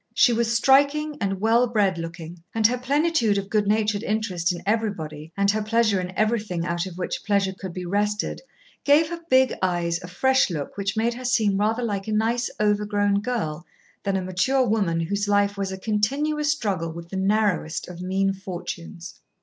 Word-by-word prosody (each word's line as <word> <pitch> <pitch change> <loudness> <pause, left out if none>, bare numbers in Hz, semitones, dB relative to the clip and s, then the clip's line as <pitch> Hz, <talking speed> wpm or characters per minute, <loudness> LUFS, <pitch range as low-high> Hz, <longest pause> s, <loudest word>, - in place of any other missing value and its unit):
She 245 - +5
was 230 0 +1
striking 285 +4 +3
and 195 -2 -1
well 230 +4 +3
bred 200 -6 +1
looking, 165 0 -7
and 220 -1 +1
her 245 +3 +4
plenitude 275 -5 +1
of 200 0 -4
good 210 -2 +2
natured 210 -1 +1
interest 205 -6 -1
in 175 - -6
everybody, 165 -8 -2
and 200 0 +3
her 215 +1 -1
pleasure 215 -2 +2
in 180 0 -5
everything 215 -6 0
out 175 +1 -2
of 180 -2 -9
which 185 - -4
pleasure 200 -2 +1
could 190 -1 -7
be 180 +1 -6
wrested, 205 +3 -1 0.4
gave 300 +2 +4
her 340 0 -5
big 260 0 +4
eyes 175 -2 0
a 180 - -8
fresh 265 +9 +2
look 150 -5 -5
which 200 +1 -2
made 230 +2 +1
her 250 +2 -8
seem 215 -5 +2
rather 220 +4 +1
like 200 -3 -3
a 215 - -1
nice 230 +3 +1
overgrown 205 -1 +1
girl 205 -10 -3 0.4
than 195 -1 0
a 190 - -2
mature 250 +9 +1
woman 195 -7 +1
whose 200 +5 -1
life 205 0 +2
was 195 -1 -3
a 190 - -5
continuous 280 +9 0
struggle 195 - -2
with 170 +1 -9
the 195 - -6
narrowest 195 -4 0
of 180 -1 -9
mean 195 +1 0
fortunes. 180 -1 -7
205 Hz, 190 wpm, -24 LUFS, 185-230 Hz, 0.4 s, She